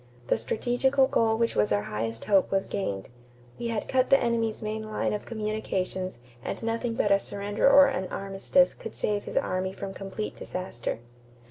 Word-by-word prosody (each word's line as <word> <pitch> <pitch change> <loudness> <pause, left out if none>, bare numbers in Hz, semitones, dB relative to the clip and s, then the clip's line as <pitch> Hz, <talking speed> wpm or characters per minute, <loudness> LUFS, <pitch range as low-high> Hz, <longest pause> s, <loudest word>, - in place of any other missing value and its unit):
The - - +4
strategical 265 +4 +2
goal 225 -3 +2
which 230 0 +1
was 105 - +2
our 105 0 +2
highest 115 +2 -3
hope 195 -3 +4
was 195 0 +1
gained. 100 - -3 0.5
We 235 - -2
had 230 -2 -2
cut 260 0 +2
the 275 - +7
enemy's 230 -2 0
main 215 +1 -2
line 215 -1 -2
of 210 - -4
communications 190 - -3 0.2
and - - -4
nothing 230 +1 -1
but 205 - +1
a 200 - +6
surrender 205 +5 +1
or 280 0 +9
an 270 -9 -1
armistice 195 +9 +2
could 225 - -9
save 205 -1 -1
his - - -4
army 185 +1 0
from 195 0 -6
complete 195 +2 -5
disaster." 120 -11 -4
210 Hz, 175 wpm, -27 LUFS, 190-230 Hz, 0.5 s, or